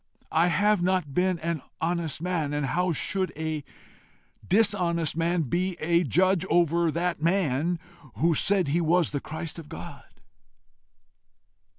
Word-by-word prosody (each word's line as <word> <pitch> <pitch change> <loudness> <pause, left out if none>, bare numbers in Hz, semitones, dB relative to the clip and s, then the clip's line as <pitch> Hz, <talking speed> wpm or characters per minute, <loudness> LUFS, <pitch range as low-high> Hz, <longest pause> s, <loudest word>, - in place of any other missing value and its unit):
I 165 +2 +3
have 205 +3 +2
NOT 180 -5 0
been 180 +2 +1
an 165 -2 -2 0.2
honest 165 -2 -2
man, 165 -5 -1
and 145 -1 -1
how 180 +6 0
should 185 +3 -1
a 155 -2 -3 0.8
dishonest 180 -6 +2
man 170 +1 +1
be 175 +7 -1
a 170 +2 +2
judge 185 - +2
over 170 0 +3
that 170 0 -2
man 170 -1 +1 0.4
who 165 +4 +2
said 190 +1 +3
he 165 +5 +1
was 170 +1 +2
the 145 - -2
Christ 160 +1 -6
of 155 -2 -11
God? 160 -6 -9
170 Hz, 140 wpm, -26 LUFS, 155-180 Hz, 0.8 s, I